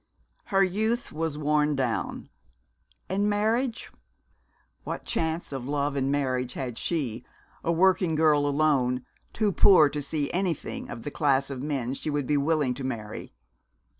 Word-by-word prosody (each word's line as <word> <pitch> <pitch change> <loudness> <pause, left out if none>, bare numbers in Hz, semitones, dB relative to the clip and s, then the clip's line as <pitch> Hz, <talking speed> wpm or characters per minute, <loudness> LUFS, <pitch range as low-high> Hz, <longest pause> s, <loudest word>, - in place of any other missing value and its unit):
Her 195 0 +3
youth 220 +6 0
was 160 -1 -3
worn 150 0 +2
down. 125 -4 -2 0.8
And 200 +2 +1
marriage? 225 +4 0 0.9
What - - -5
chance 160 0 -2
of 135 -2 -5
love 145 0 -1
and 135 0 0
marriage 130 -3 -1
had 125 -4 -4
she, 125 -8 -2 0.4
a 170 - +1
working 180 -1 +3
girl 150 -2 +4
alone, 140 -4 +1 0.3
too 215 -2 +1
poor 180 -6 +6
to 145 +1 -3
see 145 0 -2
anything 180 -3 -2
of 120 -1 -7
the 145 - -4
class 140 -2 +1
of 130 -2 -5
men 135 -4 -2
she 145 - -4
would 145 -2 -1
be 150 - +1
willing 145 -2 +2
to 135 +2 -7
marry? 110 - -5
145 Hz, 150 wpm, -27 LUFS, 135-170 Hz, 0.9 s, poor